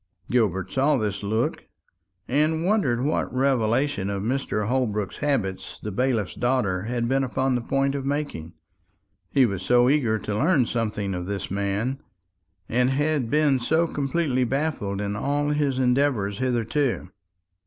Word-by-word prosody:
Gilbert 95 -6 +1
saw 140 +4 +2
this 105 -4 -2
look, 110 +3 -1 0.6
and 155 +5 +1
wondered 160 - +2
what 150 +3 0
revelation 130 -3 +1
of 100 -1 -3
Mr. 115 -3 -1
Holbrook's 110 -5 -1
habits 130 -11 -2
the 105 - -5
bailiff's 115 -2 0
daughter 120 -8 0
had 120 0 -1
been 135 +2 +2
upon 130 +1 0
the 125 - 0
point 135 +3 0
of 140 -1 -3
making; 140 - -3 0.8
he 135 -2 +4
was 100 -5 -2
so 120 +5 +4
eager 120 -7 +2
to 105 0 -4
learn 135 - +3
something 105 -4 -2
of 90 0 -4
this 100 -2 -4
man, 100 +7 -1 0.7
and 125 +2 +2
had 145 -2 0
been 145 -2 +3
so 160 +7 +2
completely 140 -3 0
baffled 130 -7 -1
in 100 0 -2
all 145 +6 0
his 145 -3 0
endeavours 125 -6 +1
hitherto. 125 -4 0
125 Hz, 145 wpm, -25 LUFS, 105-140 Hz, 0.8 s, he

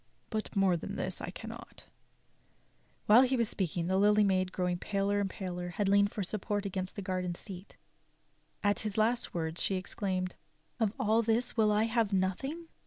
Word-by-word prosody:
But 220 -1 -3
more 195 -2 +4
than - - -6
this - - -3
I - - -4
cannot." - - -9 1.2
While 220 +4 +8
he 260 - +4
had 260 +1 +1
been 235 - +3
speaking, 175 -5 -1
the 190 +2 +1
Lily 210 +1 +5
Maid, 185 -2 +2
growing 180 -1 -1
paler 200 +1 0
and 200 -1 0
paler, 180 -2 -5
had 200 +3 -1
leaned 200 +1 +4
for 205 - -3
support 205 +1 -2
against 185 -1 -3
the 200 - -5
garden 185 -1 -2
seat. 190 +1 -10 0.9
At 205 0 +2
his 215 -2 -3
last 230 0 +1
words, 160 0 -2
she 195 - +1
exclaimed; 185 -1 -2 0.5
"Of 220 -3 +2
all 220 +2 +3
this 230 +2 +1
will 215 -2 +4
I 210 +1 +3
have 225 -2 +1
nothing!" 270 - -1
200 Hz, 180 wpm, -31 LUFS, 185-215 Hz, 1.2 s, While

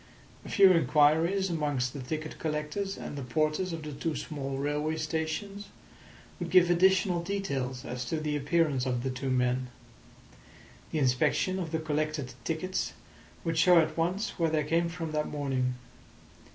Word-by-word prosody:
A - - -9
few 195 -2 +7
inquiries 165 +3 +3
amongst 145 -6 -1
the 145 - -6
ticket 155 +4 -5
collectors 155 +6 -2
and - - -6
the 140 - -4
porters 155 +7 0
of 165 -1 -5
the 150 - -6
two 150 +3 -3
small 140 -3 -4
railway 150 +3 -1
stations 160 +6 -3 0.7
would 175 -1 -3
give 175 0 +5
additional 185 0 +3
details 140 -10 -3
as 125 +1 -4
to 160 +5 -2
the 150 -1 -1
appearance 145 -3 +1
of 125 -1 -1
the 130 - -1
two 130 +1 -4
men; 125 0 +1 1.2
the - - -1
inspection 140 +7 +2
of 170 -3 -3
the 160 - 0
collected 155 -4 -2
tickets 175 +3 -2 0.5
would 165 -1 0
show 180 +1 +6
at 155 -1 +3
once 180 +7 -1
where 165 -1 +3
they 155 -1 +1
came 165 +3 +1
from 165 -2 -5
that 150 0 -1
morning. 130 -4 -1
155 Hz, 160 wpm, -29 LUFS, 140-170 Hz, 1.2 s, few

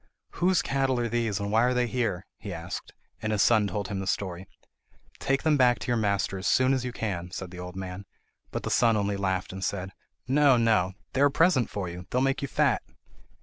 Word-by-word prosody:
"Whose 180 0 +2
cattle 135 -2 0
are 120 - 0
these, 115 -3 -1
and 100 0 -3
why 110 +1 +4
are 125 +1 +2
they 125 0 +2
here?" 115 -7 -2
he 105 - -7
asked; 85 +1 -6 0.3
and 110 - -1
his 105 -2 +3
son 110 -3 +4
told 100 0 -3
him 100 -3 -3
the 95 - -4
story. 95 -1 -2 0.7
"Take 135 0 0
them 155 -1 +3
back 125 -2 +4
to - - -7
your 120 - +2
master 100 -3 0
as 95 - -3
soon 130 +1 +4
as 130 -2 0
you 125 - -3
can," 90 -7 -4
said 90 0 -6
the 90 - -9
old 90 0 -7
man; 95 +1 -6 0.4
but - - -4
the - - -3
son 115 -2 +4
only 100 0 0
laughed, 95 -2 -2
and 95 0 -6
said: 95 +1 -2 0.4
"No, 140 -1 +5
no; 105 -5 +2 0.2
they 135 - 0
are - - +7
a - - -2
present 155 - +3
to 100 -2 -4
you! 90 +1 -7
They - - -6
will 130 - +3
make 135 0 +1
you 140 - -2
fat!" - - +2
105 Hz, 235 wpm, -27 LUFS, 95-125 Hz, 0.7 s, are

